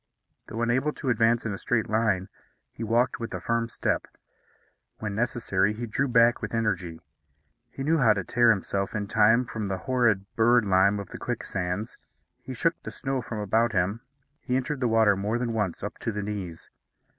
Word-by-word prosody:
Though 115 +1 -3
unable 130 +6 +1
to 130 - -2
advance 115 +1 +2
in 110 - -2
a 95 - -6
straight 115 -2 0
line, 105 -4 +1 0.4
he 115 - -7
walked 115 +3 +1
with 115 - -5
a - - -4
firm 115 0 -1
step. - - -1 0.9
When 105 -2 -4
necessary, 105 -3 0
he 115 +3 -5
drew 130 +5 -1
back 120 -1 +4
with - - -4
energy. 95 -7 -2 0.7
He 135 - -6
knew 160 +3 +2
how 115 -5 +5
to 100 -2 -3
tear 120 +5 +3
himself 100 -1 0
in 105 -1 -1
time 110 +3 +4
from 110 -3 -4
the 95 -1 -2
horrid 120 -6 +2
bird 120 0 +4
lime 100 +1 +3
of 100 - -7
the - - -9
quicksands. 90 +4 -4 0.4
He 130 - -7
shook 165 +7 0
the - - -7
snow 135 -2 -3
from 115 -1 -6
about 110 +3 +1
him. 100 +4 0 0.4
He 125 - -2
entered 135 +2 -1
the 125 - +1
water 110 -3 +4
more 105 +4 -1
than 120 -1 -2
once 105 -6 -2
up 105 - -5
to 115 - -2
the 105 -1 -4
knees. 100 -5 -6
110 Hz, 190 wpm, -26 LUFS, 100-120 Hz, 0.9 s, how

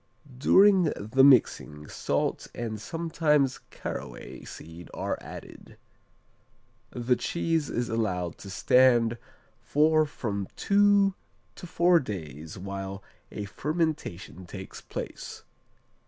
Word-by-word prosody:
During 190 +7 +6
the 110 +6 +2
mixing, 75 - +4
salt - - -1
and 110 -3 -4
sometimes 155 -2 +1
caraway - - -7
seed 80 +2 -10
are - - -2
added. - - -11 1.1
The 125 +1 +1
cheese 165 +1 -1
is 120 0 -1
allowed 90 -7 -2
to 100 - -9
stand 120 +2 +4 0.4
for 155 +1 +3
from 100 -8 -4
two 200 -1 +4 0.4
to 180 - -10
four 170 +1 +4
days 80 - -7
while 95 +1 -6 0.3
a 105 - -5
fermentation 145 - -3
takes 95 +1 -9
place. - - -7
120 Hz, 100 wpm, -28 LUFS, 95-160 Hz, 1.1 s, During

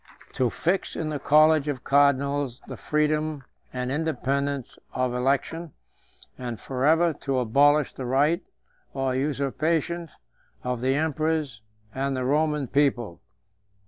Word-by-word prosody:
To 125 -2 +1
fix 180 - -1
in 155 - -3
the 150 -2 -3
college 155 +1 +4
of 135 -4 -3
cardinals 140 -2 +2
the - - -6
freedom 150 -1 0 0.3
and 125 0 -3
independence 140 -3 -2
of 130 -1 0
election, 140 +5 -1 0.7
and 120 -3 -5
forever 155 +6 +2
to 135 -2 -1
abolish 140 +4 +3
the 130 - -6
right 145 +6 +2 0.5
or 135 -1 0
usurpation 155 +5 -1 0.5
of 125 -1 -2
the 130 +1 +1
emperors 155 -5 -1 0.3
and 135 0 -1
the 130 - -2
Roman 150 +1 +1
people. 125 -9 0
140 Hz, 120 wpm, -25 LUFS, 130-155 Hz, 0.7 s, college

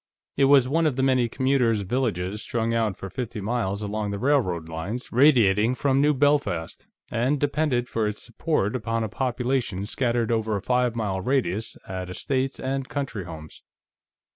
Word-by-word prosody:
It 135 - +4
was 135 -2 +6
one 160 +4 +2
of 145 - 0
the 130 - 0
many 130 -3 +3
commuters' 130 -4 +1
villages 105 -3 -1
strung 115 0 -1
out 110 -4 0
for 95 - -6
fifty 115 +3 -5
miles 105 -1 -2
along 105 0 -2
the 100 - -3
railroad 100 - +1
lines 85 +10 -5
radiating 120 -4 +4
from 135 0 +2
New 150 0 +3
Belfast, 140 - 0 0.2
and 130 +5 +1
depended 140 -4 0
for 110 -3 -1
its 105 0 -4
support 120 - -1
upon 115 -1 -1
a 110 - -3
population 125 -4 -1
scattered 120 0 0
over 110 -2 0
a 100 - -2
five 125 -1 +1
mile 100 -4 -2
radius 115 -3 -1
at 95 -1 -5
estates 135 +7 -2
and 135 0 -3
country 135 -9 -4
homes. 80 -2 -10
120 Hz, 165 wpm, -25 LUFS, 105-135 Hz, 0.2 s, was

